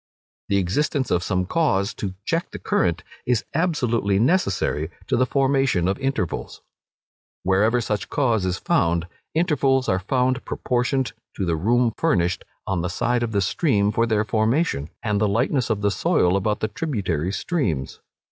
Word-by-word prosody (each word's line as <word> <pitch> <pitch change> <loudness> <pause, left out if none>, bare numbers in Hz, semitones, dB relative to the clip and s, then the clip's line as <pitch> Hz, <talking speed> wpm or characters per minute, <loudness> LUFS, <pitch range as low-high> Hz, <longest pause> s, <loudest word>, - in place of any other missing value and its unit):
The 100 - +3
existence 130 - 0
of 90 - +2
some 90 0 0
cause 100 - +1
to 95 -2 -5
check 165 +1 -1
the - - -7
current, 85 0 0 0.2
is 120 -3 +1
absolutely 125 - +1
necessary 100 - +1 0.2
to - - 0
the 130 +1 +2
formation 135 -10 +2
of 95 - -1
intervals. 110 - -3 0.8
Wherever 105 +6 +3
such 105 -2 -2
cause 120 -8 +1
is 95 0 -1
found, 85 -2 +1 0.3
intervals 140 -6 +2
are 95 - +2
found 125 +5 0
proportioned 125 +1 -1 0.2
to 95 - -2
the 85 -2 +1
room 115 +7 +2
furnished 90 - +1 0.2
on 95 -3 -1
the 90 - -2
side 120 +5 0
of 120 -1 -1
the 100 -2 +1
stream 105 - +1
for 115 +2 +1
their 105 -1 +1
formation, 110 - 0
and 105 -2 0
the 105 - +3
lightness 120 +4 +1
of 105 -2 0
the 100 0 +2
soil 90 -1 +2
about 105 +2 0
the 110 - +1
tributary 100 - -2
streams. 100 - -2
110 Hz, 160 wpm, -23 LUFS, 95-130 Hz, 0.8 s, The